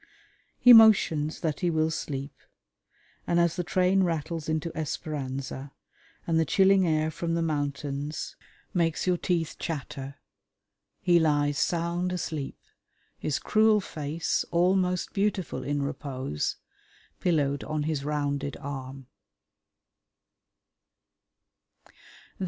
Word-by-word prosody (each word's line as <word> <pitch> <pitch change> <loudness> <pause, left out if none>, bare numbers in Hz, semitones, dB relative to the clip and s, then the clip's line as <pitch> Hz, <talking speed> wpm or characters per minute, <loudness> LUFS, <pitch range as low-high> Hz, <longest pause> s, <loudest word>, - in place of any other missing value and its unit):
He 245 - +8
motions 185 -9 +5
that 155 -3 -1
he 175 - +1
will 160 -1 +1
sleep, 140 -3 -4 0.9
and 170 - +2
as 170 -1 +2
the 180 - -2
train 185 +3 +2
rattles 165 -2 -2
into 160 +1 -2
Esperanza 140 -3 -4 0.5
and 165 -1 +2
the - - +4
chilling 190 +3 +4
air 155 0 +1
from 165 +1 -2
the 170 - 0
mountains 145 -1 -3 0.4
makes 165 -3 0
your 180 -1 +2
teeth 170 -3 -1
chatter, 140 -3 -5 0.9
he 175 -1 +4
lies 145 -2 +2
sound 175 +1 0
asleep, 155 -6 -4 0.6
his 150 - -1
cruel 215 0 +3
face, 155 -3 -2
almost 180 +1 +1
beautiful 195 -9 -1
in 145 +1 -1
repose, 130 - -3 0.6
pillowed 145 -5 +1
on 155 -1 -2
his 150 -2 -2
rounded 145 -1 -2
arm. 135 -1 -7
155 Hz, 105 wpm, -27 LUFS, 145-175 Hz, 0.9 s, He